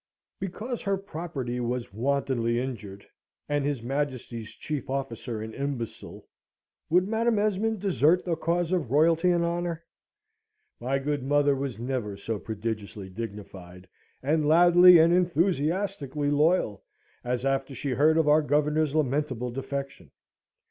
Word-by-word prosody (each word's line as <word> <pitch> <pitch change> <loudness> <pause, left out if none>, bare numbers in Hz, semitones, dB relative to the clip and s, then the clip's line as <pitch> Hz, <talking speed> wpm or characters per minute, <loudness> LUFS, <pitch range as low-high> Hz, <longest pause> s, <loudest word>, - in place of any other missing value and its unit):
Because 220 +6 -5
her 195 -1 0
property 155 -10 -5
was 120 -3 -3
wantonly 125 -1 0
injured, 105 -6 -6 0.4
and 145 -1 0
his 140 -5 -2
Majesty's 125 -4 -3
chief 150 -4 -5
officer 120 -4 -4
an 110 0 -7
imbecile, 125 -5 -5 0.6
would 180 +3 +3
Madam 225 +1 +1
Esmond 210 0 0
desert 180 -3 +3
the 170 -2 0
cause 170 +1 -1
of 175 -10 0
Royalty 165 +5 +3
and 175 -1 +2
Honour? 170 -1 -2 1.0
My 130 +3 0
good 145 +1 -2
mother 145 +1 +2
was 135 -3 -4
never 120 -4 -3
so 105 +1 -4
prodigiously 105 -2 -5
dignified, 95 -3 -8 0.4
and 150 +2 +1
loudly 175 +2 +8
and 165 +1 +5
enthusiastically 170 -3 0
loyal, 145 - +2 0.4
as 125 +1 -2
after 135 0 -1
she 140 +2 -3
heard 150 +5 +3
of 160 -2 +2
our 150 +1 +5
Governor's 150 +1 +1
lamentable 135 -4 0
defection. 135 +2 -5
145 Hz, 130 wpm, -27 LUFS, 120-170 Hz, 1.0 s, loudly